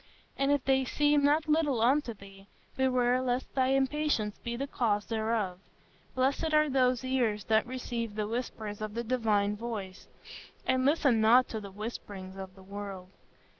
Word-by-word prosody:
And 275 +1 +1
if 285 -3 +1
they 265 0 +3
seem 290 +2 +2
not 300 +2 +3
little 300 -5 +2
unto 250 0 +2
thee, 195 0 -15 0.3
beware 255 -1 +2
lest 255 0 -2
thy 260 -1 +2
impatience 270 -5 0
be 235 0 -4
the 270 +3 -2
cause 210 -6 0
thereof.... 220 -5 -1 0.6
Blessed 275 +4 +1
are 305 -1 +4
those 255 -2 +2
ears 240 -6 0
that 220 +4 +2
receive 235 -3 -4
the 210 -1 -2
whispers 220 -3 -4
of 215 0 -5
the 235 - -2
divine 215 -4 +1
voice, 210 -4 -6 0.6
and 260 0 +2
listen 275 -6 +3
not 245 +4 +6
to 220 - -4
the 200 - -8
whisperings 195 -2 -7
of 190 -1 -8
the 190 - -15
world. 195 -2 -7
235 Hz, 165 wpm, -30 LUFS, 210-265 Hz, 0.6 s, not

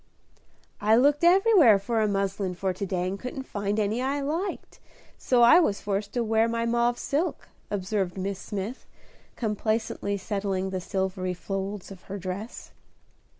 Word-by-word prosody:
"I 215 +2 +5
looked 285 +6 +3
everywhere 355 - +6
for 220 +3 -1
a 215 - +2
muslin 195 -2 -1
for 190 +1 -1
to 190 +2 -4
day 180 -1 -1
and 195 +2 -4
couldn't 265 +2 -5
find 205 -3 -2
any 215 +3 0
I 275 +2 0
liked, 330 +8 -4 0.4
so 245 -2 +2
I 235 +8 +8
was 210 - +1
forced 200 0 -2
to 240 - 0
wear 225 0 +2
my 230 0 -1
mauve 235 +1 +1
silk," 305 +8 -2 0.2
observed 195 -2 -2
Miss 195 0 -3
Smith, 205 +5 -5 0.5
complacently 215 -2 -1
settling 195 -1 -2
the 185 -1 -3
silvery 185 -1 -2
folds 195 +2 -5
of 190 -2 -11
her 200 - -4
dress. 195 +4 -6
205 Hz, 155 wpm, -26 LUFS, 195-240 Hz, 0.5 s, I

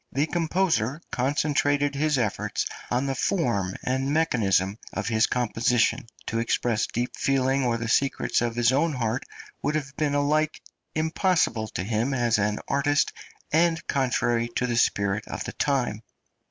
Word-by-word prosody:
The 140 +3 +1
composer 160 -6 0
concentrated 145 +2 +1
his 150 0 +1
efforts 115 -5 -1 0.2
on 125 +3 0
the 135 - 0
form 120 - 0
and 130 +2 0
mechanism 105 - +1
of 110 - -3
his 110 -2 +3
composition; 120 -1 +1 0.2
to 115 - -2
express 115 -1 0
deep 120 +2 -3
feeling 135 0 +1
or 120 -2 +1
the 115 0 -4
secrets 135 +2 +1
of 120 -1 -1
his 120 0 +3
own 155 +4 +2
heart 120 -2 -1 0.4
would 150 - 0
have 140 -2 -3
been 145 -2 0
alike 150 +2 +1 0.4
impossible 160 - +1
to 95 - -4
him 115 +6 0
as 120 -3 +2
an 105 +1 +1
artist 145 +1 +1 0.4
and 165 +1 +2
contrary 120 -3 +1
to 125 - +1
the 120 -1 -1
spirit 100 -2 +1
of - - -4
the - - -6
time. 130 -7 0
130 Hz, 155 wpm, -26 LUFS, 115-145 Hz, 0.4 s, his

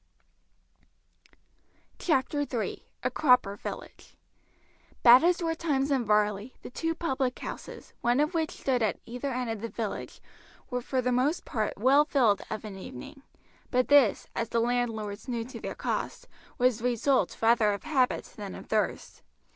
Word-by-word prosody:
CHAPTER 290 -2 +1
III: 250 -6 -3 0.2
A - - 0
CROPPER 250 -9 +3
VILLAGE - - -9 0.9
Bad 245 +3 +9
as 350 0 +2
were 325 0 +1
times 290 -4 0
in 260 -4 +1
Varley, 210 +2 +1
the - - -8
two 325 +5 -2
public 265 -6 -1
houses, - - -8
one 240 +2 +2
of 305 +4 +1
which 325 -1 0
stood 260 -7 -1
at 220 - 0
either 250 +4 -4
end 250 -2 -2
of 220 -2 -5
the 230 - -4
village, 220 -3 -5 0.5
were 250 0 -1
for 255 +1 -1
the 250 - +1
most 265 +7 +1
part 215 -3 -2
well 265 +7 +5
filled 240 -9 +2
of 220 0 -5
an 200 -2 -7
evening; 270 - -9 0.5
but 250 0 +1
this, 285 -7 +5
as 230 - -2
the 230 - +1
landlords 230 -3 -1
knew 235 -2 -2
to 245 -1 -9
their - - -5
cost, - - -3 0.3
was 250 -2 +2
the 235 - -5
result 250 +2 +1
rather 225 -2 +4
of 200 - -4
habit 265 -5 +1
than - - -6
of - - -9
thirst. - - -2
250 Hz, 165 wpm, -28 LUFS, 225-275 Hz, 0.9 s, Bad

